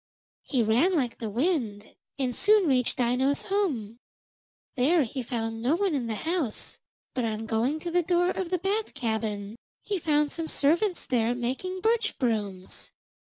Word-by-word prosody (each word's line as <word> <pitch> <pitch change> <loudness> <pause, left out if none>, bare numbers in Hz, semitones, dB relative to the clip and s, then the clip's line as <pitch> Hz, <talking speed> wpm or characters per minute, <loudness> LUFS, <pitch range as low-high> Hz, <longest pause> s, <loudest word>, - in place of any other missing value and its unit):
He 255 -5 0
ran 245 - +3
like 250 -7 -1
the 225 - -3
wind, 230 - -1 0.2
and 255 -3 -1
soon 410 -1 +4
reached 255 -2 +2
Aino's 255 +3 +2
home. 265 - -1 0.7
There 300 +5 +3
he 255 +2 -4
found 225 -2 -3
no 260 +7 +2
one 385 -1 +1
in 260 -5 -1
the 220 - -2
house, 320 - -2 0.3
but 250 - -1
on 220 -1 -2
going 235 +7 0
to 345 - -4
the 355 +1 +3
door 355 +1 +2
of 375 -3 -3
the 365 - +1
bath 400 +5 -2
cabin 220 -2 -2 0.3
he 405 -3 -2
found 300 -2 +2
some 330 -1 -3
servants 340 +7 +2
there 240 -1 +1
making 265 +10 -3
birch 450 +1 +1
brooms. 205 -7 -2
265 Hz, 160 wpm, -27 LUFS, 230-350 Hz, 0.7 s, soon